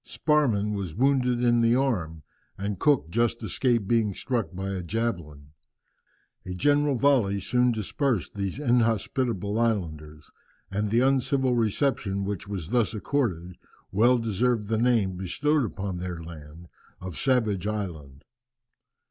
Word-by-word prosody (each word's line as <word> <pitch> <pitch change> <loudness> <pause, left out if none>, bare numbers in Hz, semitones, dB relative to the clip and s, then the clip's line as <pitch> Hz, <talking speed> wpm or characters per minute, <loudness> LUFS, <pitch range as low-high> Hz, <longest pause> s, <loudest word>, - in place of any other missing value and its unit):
Sparrman 120 -10 +1
was 95 -6 -4
wounded 125 0 +2
in 120 -1 +4
the 115 +1 +4
arm, 90 - -1 0.3
and 100 -1 -3
Cook 140 - +2
just 115 +2 0
escaped 120 -6 0
being 110 -4 +1
struck 120 -5 -2
by 95 +1 -4
a 95 -2 -3
javelin. 85 -8 -4 0.9
A 90 - -6
general 145 +6 +2
volley 120 -7 +2
soon 125 +5 +2
dispersed 115 - -1
these 100 0 -3
inhospitable 115 -4 0
islanders, 80 -10 -2 0.4
and 105 +2 -1
the 115 +3 +3
uncivil 130 0 +2
reception 110 -3 0
which 100 -1 -4
was 95 -3 -5
thus 120 -3 +1
accorded 95 - -2 0.3
well 120 +6 +4
deserved 115 -1 0
the 110 - +1
name 110 -6 +2
bestowed 145 - 0
upon 95 -3 -4
their 90 -2 -5
land 80 +1 -11 0.3
of 90 -2 -7
Savage 110 -8 +1
Island. 80 -10 -5
105 Hz, 130 wpm, -26 LUFS, 95-125 Hz, 0.9 s, in